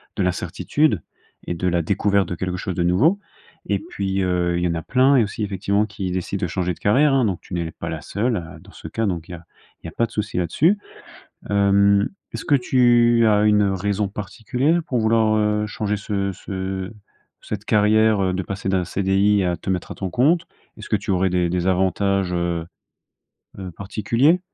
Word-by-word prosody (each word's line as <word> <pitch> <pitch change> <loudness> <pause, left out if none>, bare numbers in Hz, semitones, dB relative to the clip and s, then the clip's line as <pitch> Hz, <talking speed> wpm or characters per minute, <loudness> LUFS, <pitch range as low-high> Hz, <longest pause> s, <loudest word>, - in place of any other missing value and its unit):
de 95 - 0
l'incertitude, 105 - 0 0.4
et - - -3
de 90 +2 -2
la 85 -1 +1
découverte 100 +1 +1
de 90 - -4
quelque 90 +1 -3
chose 95 -1 -4
de 85 - 0
nouveau, 140 - +3 0.5
et - - 0
puis, 95 - -3
heu, 90 -1 0
il 90 - -1
y - - +2
en 85 - -1
a 80 - -3
plein 130 - +3
et 120 - +5
aussi, 105 +1 -4
effectivement, 100 +1 0
qui 95 -3 -5
décident 95 +2 -3
de - - +1
changer 90 +1 -1
de - - -16
carrière, 135 +7 +3
hein, 135 -2 +3
donc 95 -5 -1
tu - - -12
n'es 85 -2 -2
pas - - -8
la - - -5
seule, 115 +1 -1
heu, 80 -2 -8
dans - - -17
ce - - -10
cas 115 - -2
donc 85 -4 -3
il - - -8
y - - -6
a 85 - -13 0.4
il - - -14
y - - -5
a - - -12
pas 115 - 0
de - - -11
souci 105 -1 -4
là-dessus. 150 - +2 0.7
Hem, 100 0 +3 0.2
est-ce - - -6
que 145 - +4
tu 120 -2 +4
as 105 -1 +3
une 105 -1 +4
raison 100 +1 0
particulière 125 - -1
pour 125 - -1
vouloir, 110 -1 +3
heu, 105 0 +1
changer 105 0 -2
ce 100 -1 -2
ce 95 0 -5 0.5
cette 105 0 -6
carrière, 110 0 +3
heu, 95 -1 0
de 95 - -1
passer 95 0 -4
d'un 95 -2 +1
CDI 100 +1 +2
à 90 -1 0
te 90 - -7
mettre 90 -2 -2
à - - -6
ton 95 -2 -4
compte? 160 - +2 0.3
Est-ce 105 - -10
que 105 - +2
tu 100 0 -2
aurais 95 0 +2
des 90 -1 +1
des 90 +1 -1
avantages, 95 0 +1
heu 85 -1 -1 0.9
heu, 95 -2 -6
particuliers? 115 - +1
100 Hz, 215 wpm, -22 LUFS, 90-110 Hz, 0.9 s, et